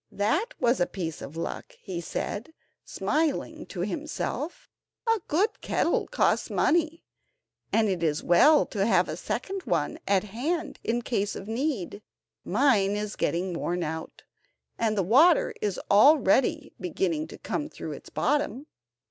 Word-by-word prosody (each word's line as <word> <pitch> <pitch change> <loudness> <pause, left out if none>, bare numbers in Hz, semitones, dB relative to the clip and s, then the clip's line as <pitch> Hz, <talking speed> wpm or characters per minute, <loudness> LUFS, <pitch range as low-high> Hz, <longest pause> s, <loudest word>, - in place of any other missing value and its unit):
"That 315 - 0
was 240 +1 +2
a 175 - +2
piece 165 -5 -5
of 155 - -8
luck," 165 - -5
he 180 -3 -5
said, 225 - -4 0.3
smiling 310 -2 -1
to - - -5
himself; 360 +12 -4 0.4
"a 455 -1 +3
good 395 +8 +1
kettle - - 0
costs - - +1
money, 330 0 +1 0.7
and 225 -1 +3
it 185 -4 -1
is 155 -3 +1
as - - -18
well 295 - +6
to 200 -3 -2
have 185 -5 +3
a 155 - -4
second 375 - -4
one 165 -4 -1
at 195 -2 +3
hand 290 - -3
in 235 +1 -1
case 205 -5 -1
of 195 - -7
need; 225 - -2 0.4
mine 205 -3 +3
is 210 0 -3
getting 180 +2 -1
worn 175 +1 -2
out, 160 +1 -6 0.5
and 220 -2 0
the 195 - +2
water 295 - +5
is 205 -3 -1
already 260 +2 +4
beginning 170 -3 -1
to - - -10
come 300 0 -3
through - - -7
its - - -9
bottom." 290 -2 0
215 Hz, 150 wpm, -27 LUFS, 180-300 Hz, 0.7 s, well